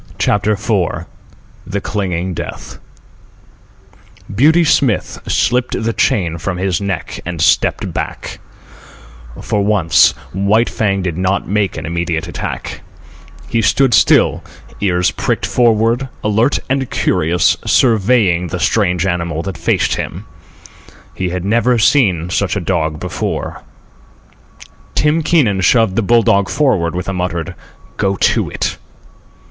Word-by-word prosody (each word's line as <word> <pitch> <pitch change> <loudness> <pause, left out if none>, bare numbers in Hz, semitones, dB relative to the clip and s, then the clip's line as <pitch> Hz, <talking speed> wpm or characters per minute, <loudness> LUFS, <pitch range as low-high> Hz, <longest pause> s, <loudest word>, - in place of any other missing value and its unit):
CHAPTER 105 +1 +1
IV 100 -4 -1 0.6
THE 100 +1 -2
CLINGING 95 -3 -3
DEATH - - -7 1.5
Beauty 155 - +4
Smith 135 - +1
slipped 125 +1 0
the 115 +1 -1
chain 85 -7 0
from 90 +2 -3
his 95 -1 -1
neck 95 -7 -4
and 85 -1 -5
stepped 80 - +1
back. - - -5 1.0
For 105 -2 0
once 90 -7 +4 0.2
White 100 +5 +2
Fang 100 -3 0
did 90 -2 -3
not 95 +1 0
make 100 -3 -1
an 80 - -5
immediate 85 0 -2
attack. - - -6 0.7
He 115 - 0
stood 120 +6 +2
still, 95 - +4 0.4
ears 90 -3 +1
pricked - - -2
forward, 120 +2 +1
alert 110 +6 +2
and 135 -1 -1
curious, 80 +2 +1
surveying 105 -6 +2
the 90 - -4
strange 90 -1 +1
animal 85 -3 -2
that 95 -2 -5
faced - - 0
him. - - -5 0.9
He 95 -1 -3
had 90 +1 -4
never 120 +4 +2
seen 110 - +2
such - - 0
a - - 0
dog 80 -1 -1
before. - - -4 1.3
Tim 150 +2 +2
Keenan 130 - +2
shoved 110 +1 +3
the 115 - +2
bull 115 +2 +3
dog 100 -2 +2
forward 90 - +1
with 90 - -4
a 95 - -2
muttered 90 -3 -3 0.4
"Go 100 0 0
to - - +1
it." - - -3
100 Hz, 130 wpm, -16 LUFS, 90-115 Hz, 1.5 s, Beauty